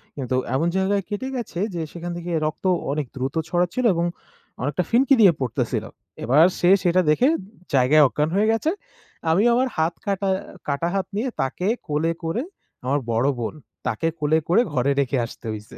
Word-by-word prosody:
কিন্তু 130 -2 -2 0.2
এমন 165 +5 +1
জায়গায় 195 +1 +1
কেটে 210 +6 -3
গেছে 225 -8 -4 0.2
যে 165 - -2
সেখান 175 0 -6
থেকে 175 0 -5
রক্ত 155 +5 -4 0.3
অনেক 150 -1 -1
দ্রুত 130 +3 -3
ছড়াচ্ছিল 180 +8 0
এবং 170 0 0 0.6
অনেকটা 145 +7 0
ফিনকি 265 +3 +4
দিয়ে 190 -5 +7
পড়তেছিল। 125 - -1 0.4
এবার 140 +8 +5
সে 175 - +3
সেটা 180 +1 +3
দেখে 245 - +4 0.5
জায়গায় 140 +4 +5
অজ্ঞান 150 +4 -1
হয়ে 210 +2 +3
গেছে। 265 +9 +1 0.6
আমি 190 +6 +3
আমার 255 +2 +2
হাত 160 +2 +1
কাটা 195 -1 0 0.4
কাটা 145 +4 0
হাত 190 -1 -1
নিয়ে 245 +5 -1
তাকে 145 +8 -2 0.2
কোলে 155 +3 0
করে, 200 - -1 0.4
আমার 140 +3 +1
বড় 115 +4 +2
বোন, 115 -2 -3 0.3
তাকে 135 +9 -1
কোলে 155 +1 +2
করে 195 +8 +4
ঘরে 135 +2 +2
রেখে 135 0 +1
আসতে 115 - -12
হইছে। 105 0 -8
165 Hz, 170 wpm, -23 LUFS, 140-195 Hz, 0.6 s, দিয়ে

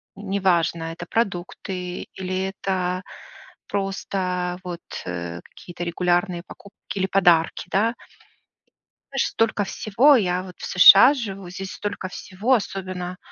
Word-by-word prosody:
неважно, 185 -4 0
это 170 +1 -8
продукты, 180 -3 -3
или 185 0 -3 0.2
это 185 -1 -2 0.6
просто 185 -2 -2
вот, 175 -1 -6 0.2
э, 85 -1 -5
какие-то 175 0 -9
регулярные 175 +1 0
покупки 200 +1 -10
или 190 - +1
подарки, 175 -3 +3
да. 225 +5 +2 1.2
Знаешь, 270 - +1
столько 220 -2 0
всего 235 +10 +4
я 180 -6 +1
вот 185 -1 -10
в - - -7
США 195 +8 +9
живу, 195 -8 -6
здесь 190 +1 -6
столько 200 -2 -4
всего, 190 +6 -2
особенно 185 -5 -3
185 Hz, 115 wpm, -23 LUFS, 180-200 Hz, 1.2 s, США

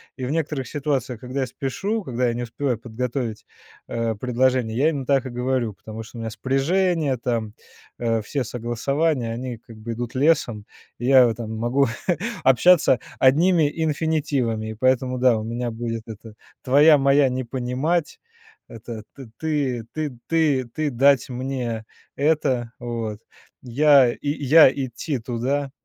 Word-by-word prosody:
и 130 - -5
в 130 - -3
некоторых 150 -5 -2
ситуациях, 135 -5 -2
когда 130 +3 -4
я 130 - -1
спешу, 195 - -3
когда 125 -2 -1
я 120 - 0
не 120 - -4
успеваю 120 0 -2
подготовить, 115 -1 -4 0.4
э, 115 -1 -2
предложение, 125 0 0
я 150 +4 +4
именно 140 -4 -3
так 135 -1 +1
и - - -5
говорю, 125 -2 -1
потому 110 +3 -9
что 115 +2 -11
у - - -6
меня 110 -1 -4
спряжение 150 - +1
там, 115 -3 -2 0.5
э, 115 -2 0
все 135 +3 -2
согласования, 125 +3 -1
они 125 +1 -5
как 115 -1 -14
бы 110 +2 -6
идут 120 +2 -5
лесом, 130 -7 +1 0.3
и 120 - -5
я 130 -1 +7
вот 115 -1 -2
там 110 -2 -5
могу 120 +5 +1 0.6
общаться 135 0 +5 0.2
одними 155 +3 +4
инфинитивами, 145 -8 -1
и - - -8
поэтому, 130 +2 +1
да, 125 -3 +4
у 110 - -4
меня 120 +1 -3
будет 115 0 -4
это: 110 0 -10 0.3
"Твоя 145 +3 +6
моя 140 0 +4
не 130 +1 -3
понимать", 130 +7 -1 0.7
это: 115 -1 -8 0.3
"Ты 140 -7 -1
ты 155 -3 -2 0.2
ты 155 -5 +2
ты 155 -2 -1
дать 135 +1 +3
мне 125 -3 -4 0.3
это", 135 -5 +1
вот 115 -3 -4 0.4
"Я, 135 0 +5
я 145 0 +5
идти 135 +1 -3
туда", 130 +4 -2
130 Hz, 150 wpm, -23 LUFS, 115-140 Hz, 0.7 s, я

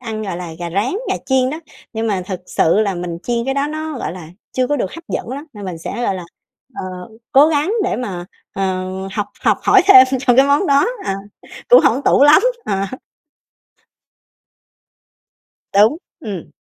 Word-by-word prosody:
ăn, 220 -3 -5
gọi 190 -4 -4
là, 175 -1 -6
gà 170 -1 -5
rán, 200 +7 0 0.2
gà - - +1
chiên 260 -1 +2
đó. 310 +3 -5 0.3
Nhưng 225 0 -2
mà 195 -4 -1
thực 185 -2 -5
sự 165 +5 +2
là 200 -3 0
mình 175 -1 -5
chiên 235 -1 -1
cái 270 - -1
đó 280 +1 0
nó, 310 -2 -5
gọi - - -4
là, 175 -4 -10 0.2
chưa 255 -1 0
có 290 - 0
được - - -2
hấp 335 +1 -10
dẫn - - -4
lắm. 280 +5 -6
Nên 205 -3 -9
mình 180 -3 -5
sẽ, 235 +8 -5
gọi 195 - 0
là, 180 -2 -6 0.5
ờ, - - -5 0.5
cố 280 +3 +7
gắng 310 +6 0
để - - -1
mà, 185 -8 -5 0.3
ờ, 185 -1 -2 0.2
học 205 -2 -2 0.2
học - - +2
hỏi 390 -2 +5
thêm 265 -10 +9
cho 250 -3 +3
cái 270 +1 +6
món 285 +7 +2
đó, 280 +5 +4 0.2
ờ, 195 - -1 0.5
cũng - - +8
hổng 275 - +2
tủ 280 - +4
lắm. 295 +6 +7 0.2
Ờ - - -1
ha. 195 +6 -3 2.7
Đúng, 215 +9 +4 0.2
ừm. 200 -7 -7
235 Hz, 195 wpm, -18 LUFS, 190-280 Hz, 2.7 s, thêm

